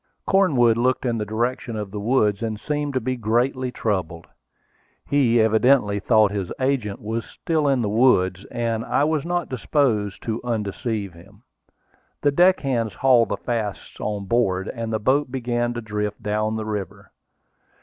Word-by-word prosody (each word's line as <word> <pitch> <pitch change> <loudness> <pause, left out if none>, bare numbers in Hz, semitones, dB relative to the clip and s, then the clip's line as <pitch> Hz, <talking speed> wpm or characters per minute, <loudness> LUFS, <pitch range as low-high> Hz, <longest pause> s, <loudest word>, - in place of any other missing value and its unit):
Cornwood 130 - +3
looked 130 +2 +1
in 120 -2 0
the 105 - -3
direction 120 +2 -2
of 105 -2 -5
the 105 - -5
woods, 105 -2 +1
and 110 -2 -3
seemed 145 +2 -3
to - - +3
be 130 +2 -2
greatly 125 +3 0
troubled. 90 -8 -2 0.8
He 125 -5 +3
evidently 110 -1 +3
thought 110 0 +3
his 100 -3 -3
agent 130 -7 -1
was 115 +2 -3
still 155 -3 -2
in 135 -3 +2
the - - 0
woods, 100 -5 +3
and 115 -2 -2
I 140 - +1
was 155 0 0
not 175 -1 -1
disposed 115 -6 0
to 115 0 -3
undeceive 110 -3 -3
him. 100 +6 -17 0.8
The 145 - +4
deckhands 135 - +2
hauled 125 -2 +4
the 100 - -2
fasts 110 -2 -4
on 105 -2 -3
board, 95 -4 +1
and 115 -2 -4
the 110 - +1
boat 130 +5 +1
began 120 -2 -1
to 120 - -3
drift 105 -1 -4
down 110 +1 -1
the 110 -1 -3
river. 100 -2 -5
115 Hz, 160 wpm, -23 LUFS, 105-130 Hz, 0.8 s, The